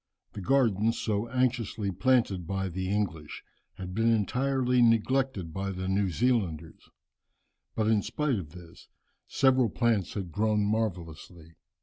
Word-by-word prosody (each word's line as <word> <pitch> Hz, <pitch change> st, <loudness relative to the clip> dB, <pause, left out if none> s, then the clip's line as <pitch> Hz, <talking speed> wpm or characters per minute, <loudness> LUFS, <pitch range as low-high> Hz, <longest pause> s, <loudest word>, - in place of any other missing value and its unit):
The 100 Hz, -, -7 dB
gardens 115 Hz, -1 st, +2 dB
so 105 Hz, +1 st, -1 dB
anxiously 115 Hz, -5 st, -1 dB
planted 95 Hz, -3 st, +1 dB
by 95 Hz, 0 st, -2 dB
the 95 Hz, +2 st, -4 dB
English 95 Hz, -7 st, -3 dB, 0.3 s
had 90 Hz, -1 st, -7 dB
been 115 Hz, +3 st, +2 dB
entirely 125 Hz, +3 st, +1 dB
neglected 115 Hz, -5 st, +1 dB
by 95 Hz, 0 st, -3 dB
the 95 Hz, -1 st, -4 dB
New 95 Hz, 0 st, +1 dB
Zealanders, 90 Hz, -7 st, -1 dB, 0.9 s
but 110 Hz, -, 0 dB
in 110 Hz, -1 st, +3 dB
spite 145 Hz, -4 st, -1 dB
of 80 Hz, -5 st, -8 dB
this 85 Hz, +1 st, -14 dB, 0.4 s
several 130 Hz, -3 st, +3 dB
plants 115 Hz, -4 st, 0 dB
had 95 Hz, -5 st, -4 dB
grown 105 Hz, +2 st, +1 dB
marvellously. 85 Hz, -6 st, -4 dB
105 Hz, 130 wpm, -28 LUFS, 95-120 Hz, 0.9 s, in